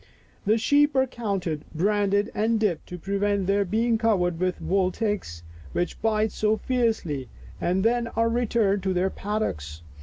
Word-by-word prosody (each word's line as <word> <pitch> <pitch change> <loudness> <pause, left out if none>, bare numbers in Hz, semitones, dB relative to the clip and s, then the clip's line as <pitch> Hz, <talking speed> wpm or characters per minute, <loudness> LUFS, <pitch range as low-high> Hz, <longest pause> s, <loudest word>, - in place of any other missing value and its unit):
The 215 +2 +4
sheep 290 +5 +3
are 265 0 +4
counted, 195 - -3
branded 205 +3 +1
and 225 +1 +1
dipped 205 -7 0
to 180 - -6
prevent 200 +2 0
their 200 +1 +2
being 225 +4 +1
covered 180 -7 +1
with 185 0 -1
wood 185 -1 0
ticks, 205 - -3 0.3
which 175 - -2
bite 220 -1 +1
so 215 0 +1
fiercely, 220 - -1 0.3
and 185 +2 +1
then 235 0 +2
are 230 0 0
returned 230 -4 +1
to 190 0 0
their 185 +2 +1
paddocks. 85 - -3
205 Hz, 155 wpm, -25 LUFS, 180-225 Hz, 0.3 s, The